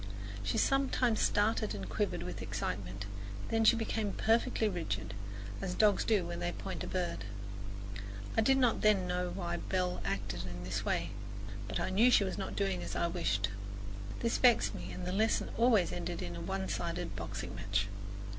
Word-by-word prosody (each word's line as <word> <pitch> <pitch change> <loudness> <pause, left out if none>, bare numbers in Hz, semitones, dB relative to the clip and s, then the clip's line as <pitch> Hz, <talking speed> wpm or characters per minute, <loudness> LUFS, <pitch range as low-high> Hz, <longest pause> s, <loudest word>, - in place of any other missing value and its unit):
She 100 0 -1
sometimes 260 -4 +3
started 215 +1 +2
and 95 -1 -5
quivered - - -1
with - - -5
excitement, 95 +1 -3 0.4
then 225 0 +3
she 220 - +7
became 220 -2 -1
perfectly 225 0 +2
rigid, 105 - -2 0.5
as 185 -2 -2
dogs 210 0 +5
do 210 -5 +3
when 85 - -4
they 85 0 -1
point - - -4
a - - -4
bird. 85 +4 -2 1.1
I - - +5
did 270 +4 +5
not 250 -3 +3
then 210 -3 +5
know 180 0 0
why 175 -2 -2
Belle 180 0 -1
acted 95 -2 -2
in 90 0 -6
this 95 +2 -2
way; 85 -2 0 0.6
but - - -2
I - - -1
knew 220 +6 +6
she 230 - +6
was 190 -1 -2
not 195 - -3
doing 195 -3 0
as - - -4
I - - +2
wished. 105 - +1 0.7
This 230 - +1
vexed 245 -2 +5
me - - -6
and 180 - -5
the 180 - -1
lesson 220 +3 +2
always 230 -6 +4
ended 175 0 -3
in 85 0 -4
a 85 - -5
one 95 +3 -2
sided 95 0 -2
boxing - - -4
match. 100 0 0
180 Hz, 180 wpm, -33 LUFS, -, 1.1 s, she